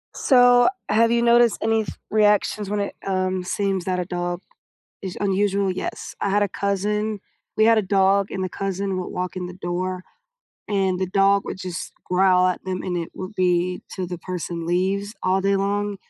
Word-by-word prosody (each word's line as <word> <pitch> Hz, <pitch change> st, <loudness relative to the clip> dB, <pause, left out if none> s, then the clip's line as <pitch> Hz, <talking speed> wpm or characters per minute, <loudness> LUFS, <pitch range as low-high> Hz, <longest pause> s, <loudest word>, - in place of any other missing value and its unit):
So 245 Hz, -1 st, +5 dB, 0.2 s
have 230 Hz, +1 st, +4 dB
you 235 Hz, 0 st, +3 dB
noticed 235 Hz, -1 st, +4 dB
any 225 Hz, 0 st, +2 dB
th -, -, -8 dB
reactions 210 Hz, -1 st, +2 dB
when 210 Hz, 0 st, -1 dB
it, 200 Hz, -, -3 dB
um, 185 Hz, -1 st, -1 dB
seems 190 Hz, 0 st, -1 dB
that 185 Hz, -1 st, -1 dB
a 180 Hz, -, -2 dB
dog 175 Hz, 0 st, -3 dB, 0.6 s
is 190 Hz, -2 st, -6 dB
unusual? 200 Hz, -1 st, +1 dB
Yes, 185 Hz, -, -5 dB
I 200 Hz, -, +1 dB
had 205 Hz, +1 st, +3 dB
a 200 Hz, -, -1 dB
cousin 210 Hz, +2 st, -1 dB, 0.4 s
we 220 Hz, -, +4 dB
had 225 Hz, -1 st, +5 dB
a -, -, +1 dB
dog, 195 Hz, 0 st, +2 dB
and 190 Hz, -, -3 dB
the 185 Hz, -, -2 dB
cousin 195 Hz, 0 st, -3 dB
would 180 Hz, -, -4 dB
walk 180 Hz, +1 st, -4 dB
in 180 Hz, -1 st, -4 dB
the 180 Hz, -, -8 dB
door, 185 Hz, 0 st, -3 dB, 0.7 s
and 190 Hz, -3 st, +1 dB
the 190 Hz, -, +1 dB
dog 195 Hz, +1 st, +3 dB
would -, -, -4 dB
just 180 Hz, -2 st, -6 dB
growl 185 Hz, 0 st, +3 dB
at 180 Hz, -, -1 dB
them, 185 Hz, -1 st, -3 dB
and 180 Hz, -1 st, -3 dB
it 165 Hz, -, -4 dB
would 185 Hz, +3 st, -7 dB
be 180 Hz, -1 st, +1 dB
till 185 Hz, -, -3 dB
the 175 Hz, 0 st, -6 dB
person 170 Hz, -1 st, -5 dB
leaves 195 Hz, +4 st, 0 dB
all 185 Hz, +1 st, +2 dB
day 195 Hz, +1 st, +2 dB
long. 205 Hz, +1 st, -1 dB
195 Hz, 195 wpm, -23 LUFS, 185-205 Hz, 0.7 s, So